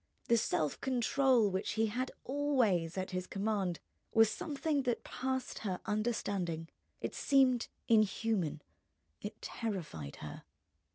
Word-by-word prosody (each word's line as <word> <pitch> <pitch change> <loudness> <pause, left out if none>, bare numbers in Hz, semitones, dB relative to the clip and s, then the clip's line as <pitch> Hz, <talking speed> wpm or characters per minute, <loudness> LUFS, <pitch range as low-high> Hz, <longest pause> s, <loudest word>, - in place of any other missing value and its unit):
The 235 - +6
self 155 -8 0
control 255 -3 +3
which 190 +2 -1
he 220 +1 +2
had 250 +4 -1
always 240 - +1
at 185 0 -2
his 185 0 -2
command 195 -4 -1 0.4
was 225 -1 +7
something 295 -1 -1
that 245 -3 -1
passed 260 0 -3
her 190 -4 -2
understanding; 200 -7 -1 0.3
it - - -3
seemed 260 -4 +4 0.2
inhuman, 215 -8 +2 0.6
it 210 +1 -6
terrified 165 - -4
her. 75 -1 -8
215 Hz, 120 wpm, -34 LUFS, 185-255 Hz, 0.6 s, was